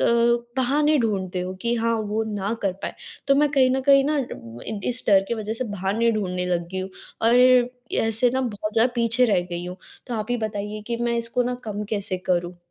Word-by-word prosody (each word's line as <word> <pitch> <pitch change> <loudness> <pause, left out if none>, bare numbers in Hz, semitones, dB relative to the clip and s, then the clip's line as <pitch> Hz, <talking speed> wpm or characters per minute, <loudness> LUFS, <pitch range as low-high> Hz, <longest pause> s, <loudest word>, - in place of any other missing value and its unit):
अ, - - +2 0.5
बहाने 295 +4 +3
ढूँढते 190 -5 -1
हो 180 +1 -4
कि 235 0 +1
हाँ 230 0 +1
वो 215 +2 0
ना 200 +1 -2
कर 195 -2 +1
पाएँ। - - -4 0.3
तो 275 - +6
मैं 295 +1 +4
कहीं 265 -3 +4
न - - 0
कहीं 275 -1 +7
ना 305 - +1 0.5
इ 215 -2 -4
इस 250 0 -2
डर 195 -2 +6
की 235 - 0
वज़ह 215 -1 -4
से 255 +3 -3
बहाने 205 +4 +1
ढूँढने 180 -4 -2
लग 175 -1 -1
गई 190 - -2
हूँ। 190 +1 -5 0.4
और 235 - +5 0.7
ऐसे 225 +2 +2
ना 260 - +1
बहुत 210 -4 -3
ज़्यादा 240 +2 +3
पीछे 235 +1 +3
रह 200 -5 +3
गई 175 0 -4
हूँ। 180 +1 -6 0.3
तो 245 - -4
आप 215 -1 -2
ही 245 - +2
बताइए 210 -1 -4
कि 235 - -2
मैं 235 0 +1
इसको 235 +2 -1
ना 250 +1 -1
कम 210 -1 -4
कैसे 200 -3 -1
करूँ? 175 -1 0
220 Hz, 220 wpm, -24 LUFS, 195-245 Hz, 0.7 s, कहीं